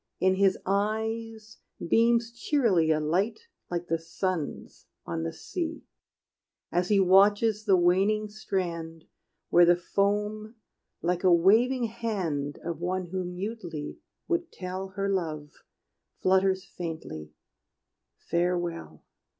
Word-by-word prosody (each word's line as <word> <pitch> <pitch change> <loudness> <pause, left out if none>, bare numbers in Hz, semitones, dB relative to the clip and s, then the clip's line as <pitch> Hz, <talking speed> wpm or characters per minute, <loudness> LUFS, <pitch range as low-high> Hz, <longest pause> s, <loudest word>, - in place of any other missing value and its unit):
In 185 0 +3
his 190 0 +3
eyes 220 +2 -2 0.3
beams 230 +3 +3
cheerily 230 - +2
A 155 -1 +3
light 185 - 0 0.3
like 175 0 -3
the 165 -1 -1
sun's 165 -1 -4 0.2
on 165 - -3
the 165 0 -2
sea, 320 - -5 0.9
As 175 +1 0
he 205 -2 +4
watches 205 +3 +4
the 195 -3 +5
waning 195 +5 +3
strand, 170 -6 -4 0.5
Where 175 - +7
the 175 0 +6
foam, 210 +4 -1 0.5
like 180 +1 0
a 185 - +5
waving 225 +9 +4
hand 195 -11 -2
Of 165 -2 -3
one 180 0 -2
who 185 -1 -2
mutely 180 -4 -5 0.3
would 345 -1 -1
tell 185 +1 -5
Her 195 +1 -3
love, 160 -6 -2 0.7
flutters 190 0 +3
faintly, 160 - -7 0.8
"Farewell." 175 0 -2
190 Hz, 115 wpm, -28 LUFS, 170-215 Hz, 0.9 s, Where